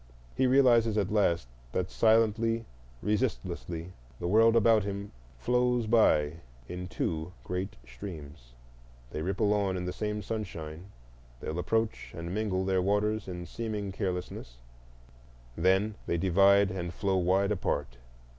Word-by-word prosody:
He 130 - +3
realizes 120 -4 +4
at 100 -1 0
last 85 - +2 0.3
that 90 0 -1
silently, 115 0 +3 0.4
resistlessly, 90 - -2 0.3
the 85 - -2
world 115 +4 +5
about 115 -1 +5 0.5
flows 125 - +1
by 110 -6 +5
him 75 +3 -7 0.3
in 90 +1 -5
two 80 -2 -3
great 90 +2 -4
streams: 70 -2 -10 0.6
they 75 - -4
ripple 100 +4 +1
on 100 -3 0
in 90 - -3
the 90 - -3
same 105 +1 -3
sunshine, 90 -6 -5 0.5
they - - -6
approach 110 +7 -1
and 85 +2 -5
mingle 95 -3 -1
their 95 -1 +2
waters 105 +2 0
in 90 -1 -5
seeming 105 +1 -4
carelessness,—then 60 - -4
they 85 - +1
divide 95 +2 +4
and 85 -2 -4
flow 95 -2 +1
wide 95 +3 +2
apart. 70 -10 -2
95 Hz, 125 wpm, -29 LUFS, 85-110 Hz, 0.6 s, world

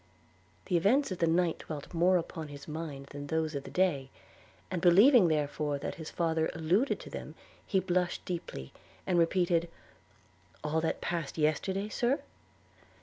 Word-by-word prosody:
The 180 - +2
events 230 - +3
of 185 - -4
the 165 - +3
night 170 0 +2
dwelt 150 0 -7
more 180 +2 +4
upon 165 -2 -5
his 145 -1 -10
mind 150 -3 -5
than 145 0 -7
those 160 0 -1
of 140 -1 -4
the - - -7
day; 150 -8 +1 0.6
and 180 -2 -2
believing 195 +5 +7
therefore 150 -1 0
that 140 - -4
his 160 - -6
father 160 -2 0
alluded 175 - +1
to - - -10
them, - - -7 0.3
he 190 - +2
blushed 180 -1 -1
deeply, 165 - -5 0.3
and 180 -2 +2
repeated, 170 0 +2 0.9
'All 155 +1 0
that 160 - -1
passed 170 -4 -3
yesterday, 175 +6 0
Sir?' 240 +6 0
165 Hz, 155 wpm, -31 LUFS, 155-185 Hz, 0.9 s, believing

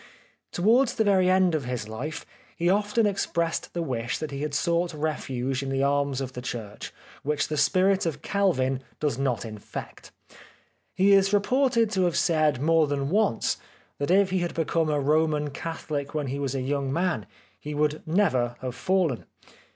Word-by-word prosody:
Towards 235 +8 +3
the 225 - +2
very 190 -3 +3
end 185 -2 +4
of 150 -5 -1
his 125 -4 -3
life 130 +9 -5 0.3
he 175 +1 +2
often 210 +3 +2
ex 200 -1 0
pressed 170 0 -2
the 170 - -1
wish 120 -5 -2
that 155 -2 -5
he 140 0 -5
had 150 -1 -2
sought 170 +1 0
refuge 135 -4 -2
in 135 - -4
the 135 0 0
arms 140 -1 +1
of 130 -1 -5
the 125 - -6
church 110 -4 -6 0.3
which 145 0 -1
the 155 - -1
spirit 185 +6 +3
of 150 -2 -4
Calvin 135 -10 +1 0.2
does 145 -5 -1
not 125 -5 -1
infect. 110 -2 -8 0.8
He 195 +2 +5
is 195 0 +4
reported 230 +1 +2
to 190 -2 +2
have 175 - 0
said 155 -6 +2
more 160 +2 +3
than 140 0 -2
once 205 - +1 0.4
that 145 - -2
if 195 +1 +4
he 190 - +1
had 175 -1 -3
become 165 0 0
a 150 -1 +1
Roman 150 0 +1
Catholic 150 -1 -5
when 150 -2 -1
he 135 +2 -3
was 140 -1 -2
a 135 - -1
young 135 0 -1
man 175 +3 -1 0.3
he 150 0 -6
would 150 +1 0
never 145 -10 +1
have 130 -1 -4
fallen. 180 -6 0
155 Hz, 180 wpm, -26 LUFS, 135-185 Hz, 0.8 s, He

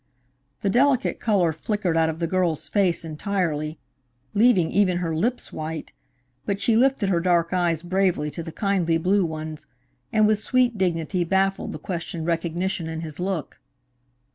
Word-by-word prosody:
The 200 - +1
delicate 265 +2 +2
color 190 -7 +2
flickered 185 +1 -1
out 160 -1 +3
of 160 - -4
the 170 - -1
girl's 170 -2 0
face 185 -5 +1
entirely, 160 -2 -2 0.6
leaving 210 -6 +4
even 190 -3 +3
her 165 -2 -2
lips 240 +10 -1
white, 155 +1 -5 0.5
but 200 -1 -2
she 220 +2 +2
lifted 250 -4 +3
her 175 -3 +2
dark 170 -1 +2
eyes 170 -3 +1
bravely 180 -4 +1
to 170 - -5
the 165 - -7
kindly 180 -4 +1
blue 190 +4 +2
ones, 155 -2 -5 0.4
and 215 -1 +4
with 215 0 +3
sweet 250 0 +2
dignity 180 -1 0
baffled 195 +2 0
the - - -5
questioned 170 -2 -5
recognition 170 +1 -1
in 160 0 -4
his 155 -1 -7
look. 180 -4 -3
180 Hz, 160 wpm, -24 LUFS, 165-200 Hz, 0.6 s, leaving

